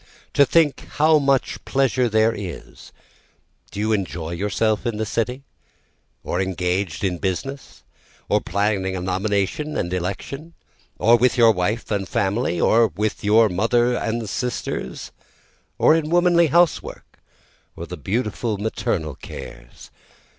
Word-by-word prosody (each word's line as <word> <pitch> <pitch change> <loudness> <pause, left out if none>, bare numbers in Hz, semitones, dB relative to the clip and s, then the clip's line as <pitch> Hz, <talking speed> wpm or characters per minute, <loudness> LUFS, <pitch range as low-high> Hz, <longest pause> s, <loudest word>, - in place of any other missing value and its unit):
To 140 - +5
think 160 -4 +2
how 155 +1 +4
much 140 -2 0
pleasure 130 -2 +1
there 110 +1 +3
is, 95 -5 -9 0.8
Do 100 - -8
you 110 +1 0
enjoy 85 -6 -2
yourself 105 +4 0
in 115 -3 -2
the 110 - -1
city? 125 +5 -2 0.8
or 90 - -1
engaged 90 -1 -2
in 90 -3 -1
business? 135 +9 -4 0.4
or - - +2
planning 100 0 -1
a - - -3
nomination 100 +10 -1
and 90 - -2
election? 120 - -5 0.4
or 120 +2 +5
with 125 -1 +2
your 115 -2 +7
wife 105 +5 -2
and 100 -3 -1
family? 100 -5 0
Or 115 +5 +4
with 105 0 -3
your 110 +2 +5
mother 115 +6 +1
and 115 -1 -2
sisters? 120 - -4 0.7
or - - +5
in 160 -1 0
womanly 175 0 +4
housework? 170 +3 +1 0.7
or 85 - -6
the 90 - -7
beautiful 105 - -2
maternal 95 -7 -2
cares? - - -11
110 Hz, 130 wpm, -22 LUFS, 95-125 Hz, 0.8 s, your